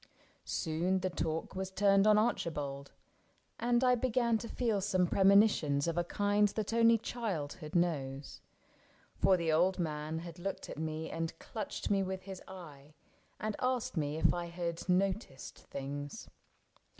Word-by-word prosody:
Soon 175 +3 0
the 185 0 -1
talk 160 -1 -3
Was 190 0 -3
turned 195 +1 +4
on 210 0 +6
Archibald, 145 -11 -1 0.7
and 240 +1 +2
I 250 -1 +5
began 240 -2 +1
To 230 - -7
feel 225 -5 0
some 185 -1 +2
premonitions 190 -7 +4
of 165 - -1
a 175 - +1
kind 205 +3 +2
That 215 +1 -3
only 230 0 +5
childhood 180 -9 -4
knows; 140 -6 -1 0.7
for 190 -1 +3
the 165 -2 0
old 180 +4 +3
man 155 -2 -3
Had 170 0 -8
looked 190 +1 -4
at - - -7
me 160 0 -3
and 165 0 -3
clutched 215 -2 -5
me 200 -1 +3
with 190 0 -3
his 190 -1 -8
eye. 150 -6 -11 0.4
And 215 -1 -2
asked 255 -4 -1
if 155 0 +1
I 175 0 -3
had 170 -1 -4
ever 185 - -1
noticed 185 - -1
things. 145 +1 -6
180 Hz, 150 wpm, -33 LUFS, 160-205 Hz, 0.7 s, on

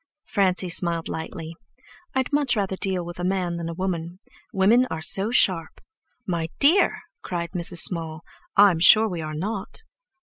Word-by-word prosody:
Francie 190 -2 0
smiled 170 -1 0
lightly. 160 0 -6 0.6
"I'd 260 +2 -1
much 285 -4 +2
rather 195 -2 -2
deal 185 -2 -2
with 175 0 -9
a - - -4
man 180 -2 -1
than 170 -1 -5
a - - -5
woman. 175 -2 -4 0.3
Women 225 +7 +3
are - - -4
so 195 +6 0
sharp!" 185 -9 +1 0.5
"My 170 -4 -3
dear," 320 +8 +3 0.2
cried 170 -1 -5
Mrs. 175 -1 +1
Small, 160 -3 +2 0.4
"I'm 195 -5 +6
sure 215 +6 +6
we're 165 -6 -5
not." 200 - -5
180 Hz, 155 wpm, -23 LUFS, 170-200 Hz, 0.6 s, I'm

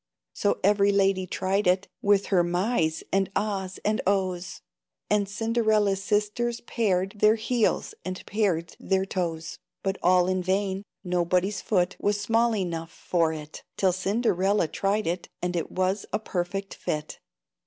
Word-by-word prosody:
So 205 - 0
every 200 0 +4
lady 195 -2 +2
tried 195 +2 0
it, 185 +2 +2
With 200 -1 +3
her 180 -2 +5
"Mys!" 175 -2 0
and 195 -1 +2
"Ahs!" 195 -3 -2
and 215 +1 +1
"Ohs!" 185 -2 -1 0.5
And 205 -2 +2
Cinderella's 215 -2 +1
sisters 210 +4 0
pared 195 -6 0
Their 215 +1 +6
heels, 230 0 0
and 185 0 -5
pared 180 -6 0
their 190 0 +1
toes, 165 -4 -3 0.2
But 195 0 -1
all 180 0 +5
in 185 0 +1
vain! 190 +1 0 0.2
Nobody's 180 +2 +1
foot 180 -3 +1
Was 205 0 +1
small 225 +2 +2
enough 170 -4 -3
for 165 -3 0
it, 155 -1 -8 0.2
Till 190 -2 +3
Cinderella 195 -1 +1
tried 200 +6 0
it, 175 +2 -2
And 180 0 -2
it 165 - -2
was 185 +2 0
a - - +1
perfect 195 -1 -3
fit. 150 0 -4
195 Hz, 145 wpm, -26 LUFS, 180-205 Hz, 0.5 s, Their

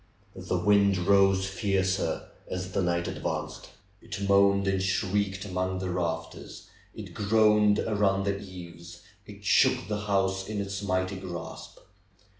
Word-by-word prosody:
The - - -2
wind 100 -1 +3
rose 95 +1 +3
fiercer 95 -1 -1 0.2
as 90 0 -4
the 95 - 0
night 85 -1 0
advanced. - - -4 0.3
It 100 0 -5
moaned 100 0 +4
and 95 -1 +1
shrieked 100 +1 -1
among 95 -1 -2
the 95 -1 -3
rafters; 85 -2 -4 0.3
it - - -9
groaned 105 0 +3
around 100 -3 +1
the 100 0 0
eaves; 85 -3 -11 0.2
it 100 0 -12
shook - - +3
the 105 0 -4
house 95 -1 0
in 105 -1 -3
its 100 0 -4
mighty 95 -1 -1
grasp. 90 -3 -8
95 Hz, 135 wpm, -28 LUFS, 95-100 Hz, 0.3 s, moaned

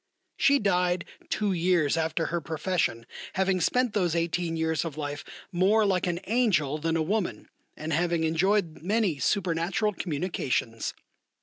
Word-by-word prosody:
She 280 0 +4
died 180 -5 +1 0.2
two 205 -2 0
years 170 -4 +2
after 165 0 0
her 170 - 0
profession, 160 -6 -1 0.3
having 190 -1 +1
spent 250 +5 +2
those 180 -5 +1
eighteen 170 0 -1
years 160 0 0
of 160 -3 -6
life 145 0 -4 0.3
more 200 +4 +3
like 185 -3 +1
an 175 0 -2
angel 190 - +2
than 165 +1 0
a 160 - +1
woman, 205 +3 -2 0.3
and 155 +1 -3
having 170 +1 +1
enjoyed 170 +2 +1
many 195 -4 +1
supernatural 185 +4 0
communications. 145 - -2
175 Hz, 140 wpm, -27 LUFS, 160-195 Hz, 0.3 s, She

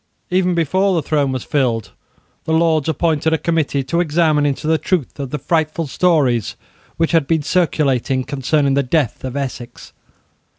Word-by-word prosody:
Even 180 -1 +2
before 185 +4 +1
the 165 - 0
throne 145 -4 +1
was 130 -2 -3
filled, 125 -7 -1 0.5
the 160 - -1
Lords 160 -2 +2
appointed 160 0 +1
a - - +3
committee 155 -4 0
to 170 +6 -1
examine 155 -3 +2
into 145 +2 -3
the 160 0 +2
truth 170 -7 -2
of 135 -2 -4
the 150 - -3
frightful 160 +2 -1
stories 140 - +1 0.4
which 165 0 +1
had 165 -5 +2
been 160 -2 +1
circulated 135 -7 0
concerning 140 0 0
the 140 - +3
death 140 -1 -1
of 130 0 -5
Essex. 130 -3 -6
150 Hz, 165 wpm, -18 LUFS, 135-165 Hz, 0.5 s, a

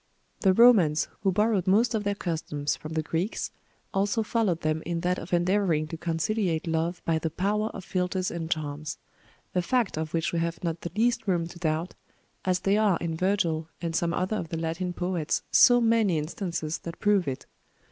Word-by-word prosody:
The 190 - +4
Romans, 195 -11 +6
who 195 - +2
borrowed 210 -1 +1
most 220 +6 +4
of 215 -2 0
their 205 0 0
customs 155 -5 -2
from 155 +1 -8
the 160 -1 0
Greeks, 170 +7 -2 0.4
also 200 +3 +1
followed 210 -7 0
them 155 0 0
in 170 0 -2
that 180 +1 0
of 165 - -9
endeavoring 175 -3 +2
to 165 - -5
conciliate 165 +1 -1
love 165 +2 -1
by 160 -1 +1
the 160 - -2
power 205 +6 0
of 190 -4 -9
philtres 185 0 -1
and 165 -1 -4
charms; 150 -1 -3 0.6
a 180 - +2
fact 215 -2 0
of 160 -1 -3
which 165 0 -1
we 170 - +1
have 170 +1 -3
not 165 -1 -2
the 170 - -4
least 230 0 +1
room 175 -3 +1
to 170 +1 -10
doubt, 160 +1 -1 0.5
as 185 -1 +1
they 200 +1 +2
are 210 -5 +3
in 165 -1 -2
Virgil 165 -3 0
and 165 -1 -3
some 170 0 +1
other 185 +5 -1
of 165 - -5
the 165 - -3
Latin 165 +3 -2
poets 175 -3 -1
so 245 -1 +7
many 225 -6 +3
instances 160 0 -3
that 170 0 -7
prove 205 -5 +2
it. 130 -1 -4
175 Hz, 195 wpm, -27 LUFS, 160-200 Hz, 0.6 s, so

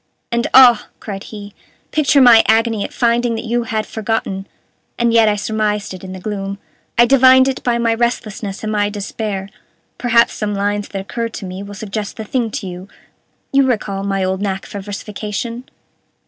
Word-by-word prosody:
"And, 235 0 0
ah!" 245 -4 +7
cried 195 -2 -7
he, 205 -2 -9 0.4
"picture 290 -2 +3
my 235 -3 +8
agony 225 -1 +2
at - - -5
finding 235 -1 +1
that 225 - -5
you 235 +1 -1
had 220 -1 -2
forgotten. 210 -3 -3 0.5
And 235 -1 +2
yet 225 -2 +5
I 210 - +1
surmised 210 -1 -1
it 185 - -10
in 185 - -7
the 190 - -7
gloom. 200 0 -4 0.4
I 240 - +7
divined 260 0 +6
it 265 - -2
by 240 -1 +1
my 230 -1 +1
restlessness 220 -4 -2
and 215 - -2
my 205 -1 +1
despair. 205 -1 -4 0.5
Perhaps 235 -1 +3
some 210 -1 -3
lines 205 +1 -1
that 195 - -5
occurred 230 +3 -4
to 205 - -6
me 185 +1 -6
will 200 0 -8
suggest 210 0 -5
the 220 - -4
thing 235 +1 -1
to 205 - -5
you 180 +1 -8 0.7
you 275 - +5
recall 205 -5 -1
my 195 -1 -1
old 190 +1 -1
knack 195 -2 -2
for 200 - -7
versification? 210 +4 -5
215 Hz, 185 wpm, -18 LUFS, 200-235 Hz, 0.7 s, my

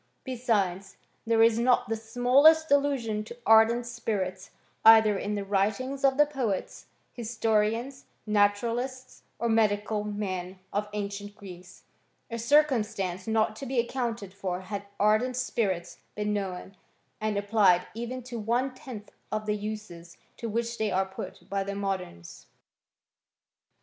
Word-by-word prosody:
Be« 260 -2 -4
sides, 200 -6 -1 0.3
there 225 0 +4
is 230 0 +4
not 245 +1 +3
the 225 - -1
smallest 255 +8 +4
allusion 270 -7 +1
to 235 +2 -10
ardent 225 +2 +5
spirits, 200 -5 -3 0.3
either 220 -2 +8
in 205 +2 -2
the 200 -1 -3
writings 215 +8 -1
of 270 -1 +4
the 295 - +6
poets, 255 -10 -3 0.3
historians, 225 +2 -1 0.2
natu 205 0 +3
ralists, 255 +2 -4 0.2
or 235 - -1
medical 215 -1 +1
men 190 -3 -4 0.2
of 210 +1 -1
ancient 205 0 -5
Greece; 185 -2 -12 0.5
a 230 - -3
cir 290 +7 +6
cumstance 210 -9 -3
not 220 -1 +1
to 270 - -6
be 265 - -3
accounted 235 -5 -2
for 185 -2 -4
had 200 +1 -6
ardent 215 +5 +3
spirits 190 -8 -2 0.2
been 210 0 -1
known, 195 -1 -4 0.5
arid 215 -1 -1
applied 200 -3 +3
even 240 +3 -5
to 240 -1 -6
one 240 +5 0
tenth 240 -5 -10 0.2
of 215 0 -2
the 210 0 0
uses 205 -5 -7 0.2
to 230 - -4
which 235 +2 -2
they 220 -1 +1
are 190 0 +1
put 190 0 -9
by 195 0 -1
the 200 +1 -5
moderns. 185 - -5
215 Hz, 145 wpm, -28 LUFS, 200-235 Hz, 0.5 s, either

